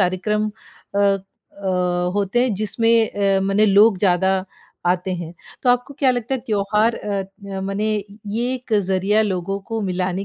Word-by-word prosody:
कार्यक्रम 210 +4 0 0.4
अ 200 - +1
अ, 190 -3 -1
होते 205 +4 +1
हैं 250 -4 +1
जिसमें 225 +2 +2 0.3
अ, - - +2
मने 195 +2 +3
लोग 200 0 +5
ज़्यादा 190 0 +2 0.4
आते 180 +1 +1
हैं। 170 -2 -6 0.3
तो 250 - +4
आपको 245 +3 0
क्या 270 -2 +3
लगता 245 +1 -1
है 260 - -2
त्योहार 210 +2 +1
अ 205 - -5
अ, 195 0 -8
मने 200 +3 -1 0.3
ये 235 +5 -1
एक 255 -2 -8 0.2
ज़रिया 195 +3 +2
लोगों 195 -1 -2
को 225 - -1
मिलाने 185 +1 -2
200 Hz, 160 wpm, -21 LUFS, 190-220 Hz, 0.4 s, लोग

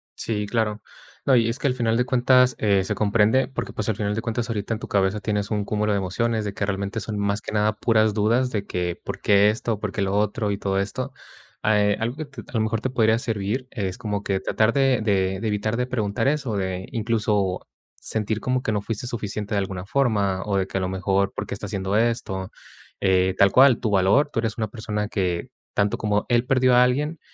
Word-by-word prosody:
Sí, 105 -2 -2
claro, 110 -1 -1 0.4
no. 135 - +5
Y 115 -2 +4
es 115 - -3
que - - 0
al 130 - +2
final 115 -3 +1
de 125 - +2
cuentas, 125 0 +4
eh, 100 -3 +2
se 95 - -2
comprende, 110 +4 +3
porque 135 - -5
pues 110 - -3
al 110 - +1
final 105 0 -2
de 115 - -2
cuentas 115 0 -3
ahorita 110 0 -2
en 110 - -4
tu - - -7
cabeza 100 +1 +1
tienes 105 0 -2
un 105 -1 0
cúmulo 105 +1 0
de 100 - +2
emociones, 110 +4 -1
de 100 - -3
que 100 - -2
realmente 100 +2 -2
son 105 0 -4
más 100 +1 0
que - - -7
nada 105 0 +2
puras 110 -2 +3
dudas 115 +4 +2
de 105 -3 -2
que, 90 -2 -3
¿por - - -6
qué 100 0 +5
esto? 110 0 -2
¿Por 105 -2 -3
qué 100 - -3
lo 100 0 0
otro? 105 +1 0
Y 100 - -2
todo 95 -1 -1
esto, 100 0 -3 0.5
eh, 105 -1 +3
algo 115 +3 -2
que 155 - -4 0.2
a - - -17
lo 115 - +1
mejor 110 0 -1
te 130 - -1
podría 110 -3 +2
servir 115 +2 -2
es 95 -6 -3
como 105 -4 -3
que 95 -2 0
tratar 110 +3 +1
de 135 -4 +3
de 95 -3 +1
de 110 - -2
evitar 110 +2 -1
de 125 - 0
preguntar 115 -1 -1
eso, 135 -6 0
de 95 -1 -3
incluso, 105 -4 0 0.4
sentir 110 0 -1
como 130 +1 0
que - - 0
no 105 -2 0
fuiste 115 +2 -4
suficiente 105 -3 -4
de 100 - +2
alguna 95 -2 -4
forma, 100 -6 +1
o 100 -2 0
de 95 -1 0
que - - -3
a 95 - 0
lo 95 - -1
mejor, 95 +1 0
¿por - - -4
qué - - -6
está 105 - -6
haciendo 95 0 -2
esto? 110 -5 -1 0.5
Eh, 95 -1 +2
tal 100 -1 +5
cual 130 0 +6
tu 110 - -1
valor. 100 +10 +3
Tú - - -1
eres 110 -1 -2
una 110 -2 -1
persona 105 -1 -3
que 90 -5 -2 0.3
tanto 100 0 +1
como 105 -1 0
él 120 0 +3
perdió 130 -1 +3
a 125 - +7
alguien, 145 +6 0
105 Hz, 235 wpm, -24 LUFS, 100-115 Hz, 0.5 s, a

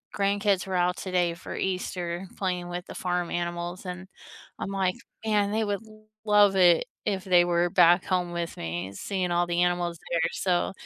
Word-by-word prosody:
grandkids 200 -1 +1
were 190 - -3
out 180 0 +2
today 180 -2 0
for 170 - -8
Easter, 180 -1 -3
playing 180 -2 -2
with 175 0 -5
the - - -10
farm 180 -1 -1
animals, 175 +1 -3
and 185 +1 -6 0.5
I'm - - -4
like, 190 0 0 0.3
"Man, 210 -2 +2
they 220 0 +1
would 205 0 -2 0.4
love 205 -2 +5
it 175 -3 +5 0.2
if 195 -2 -1
they 180 -2 +5
were 175 0 +2
back 175 0 +5
home 180 -2 0
with 170 -1 -3
me, 85 +4 -4
seeing 185 - -2
all 175 0 +2
the 175 0 +2
animals 175 -1 0
there." 170 -1 +2
So, 180 -1 0
180 Hz, 175 wpm, -27 LUFS, 175-190 Hz, 0.5 s, love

